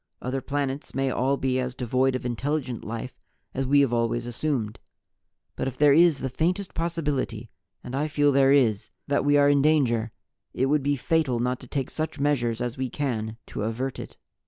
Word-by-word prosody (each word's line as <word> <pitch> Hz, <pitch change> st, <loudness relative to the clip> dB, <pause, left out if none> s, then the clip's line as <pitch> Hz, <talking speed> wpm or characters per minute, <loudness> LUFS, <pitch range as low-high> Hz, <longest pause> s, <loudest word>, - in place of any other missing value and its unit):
Other 130 Hz, +2 st, -3 dB
planets 140 Hz, 0 st, -3 dB
may 135 Hz, 0 st, +1 dB
all 135 Hz, +3 st, +1 dB
be 130 Hz, -1 st, 0 dB
as 125 Hz, -1 st, -3 dB
devoid 130 Hz, +1 st, +1 dB
of 130 Hz, -, -4 dB
intelligent 130 Hz, 0 st, -2 dB
life 115 Hz, +3 st, -6 dB, 0.3 s
as 135 Hz, 0 st, -2 dB
We 140 Hz, +1 st, +5 dB
have 135 Hz, -4 st, +1 dB
always 120 Hz, 0 st, 0 dB
assumed. 120 Hz, -3 st, -2 dB, 0.8 s
But -, -, -2 dB
if 130 Hz, -1 st, -5 dB
there 145 Hz, -1 st, +6 dB
is 165 Hz, -1 st, +5 dB
the 135 Hz, -, -3 dB
faintest 180 Hz, +8 st, -1 dB
possibility 145 Hz, -9 st, -2 dB, 0.3 s
and 125 Hz, -, -6 dB
I 145 Hz, +3 st, 0 dB
feel 145 Hz, -1 st, +2 dB
there 135 Hz, 0 st, +4 dB
is 120 Hz, -8 st, +3 dB, 0.2 s
that 140 Hz, -1 st, +1 dB
we 145 Hz, +1 st, +4 dB
are 145 Hz, 0 st, +5 dB
in 145 Hz, -1 st, +4 dB
danger, 125 Hz, -7 st, +2 dB, 0.4 s
it 130 Hz, -, +1 dB
would 145 Hz, +2 st, +2 dB
be 145 Hz, +1 st, +1 dB
fatal 140 Hz, -3 st, 0 dB
not 125 Hz, +1 st, -1 dB
to 130 Hz, -, -12 dB
take 135 Hz, +1 st, -3 dB
such 155 Hz, -1 st, -3 dB
measures 120 Hz, -5 st, 0 dB
as 125 Hz, 0 st, -3 dB
we 130 Hz, -1 st, -1 dB
can 115 Hz, -6 st, -3 dB
to -, -, -6 dB
avert 120 Hz, +5 st, -3 dB
it." -, -, -9 dB
135 Hz, 195 wpm, -26 LUFS, 120-145 Hz, 0.8 s, there